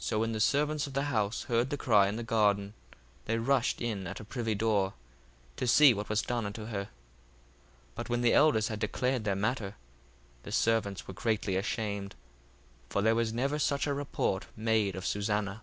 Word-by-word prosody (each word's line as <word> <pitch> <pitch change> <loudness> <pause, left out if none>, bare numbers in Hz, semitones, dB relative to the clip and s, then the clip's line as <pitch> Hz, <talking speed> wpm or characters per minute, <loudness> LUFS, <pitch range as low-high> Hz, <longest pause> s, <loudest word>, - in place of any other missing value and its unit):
1:26 - - -4
So 110 - 0
when 115 +1 0
the 110 - -3
servants 150 +5 +1
of 140 - -9
the 140 +1 0
house 110 -7 -1
heard 120 +2 0
the 145 - -2
cry 105 -7 +4
in 100 - -2
the 120 - -4
garden, 105 -2 +1 0.5
they 115 - 0
rushed 125 +1 +1
in 105 -6 -3
at 95 +3 -6
the - - -8
privy 115 0 -2
door, 100 -2 +1 0.6
to 125 - -2
see 140 +2 +7
what 105 -1 -5
was 105 0 +1
done 120 -2 -2
unto 105 +1 -6
her. 100 -3 -3
1:27 - - -23 1.0
But - - -6
when 120 0 0
the 120 -1 +4
elders 145 -8 +4
had 110 -1 -4
declared 125 +3 -1
their 100 -2 +1
matter, 105 0 -2 0.7
the - - -9
servants 105 -4 0
were 95 - -7
greatly 105 -1 -1
ashamed: 100 0 -2 0.7
for 100 - 0
there 110 +1 +4
was 115 -1 0
never 135 +6 -1
such 140 -1 +1
a 145 - 0
report 140 -8 -2
made 110 -3 +1
of 95 - -6
Susanna. 105 0 -1
110 Hz, 200 wpm, -30 LUFS, 100-120 Hz, 1.0 s, see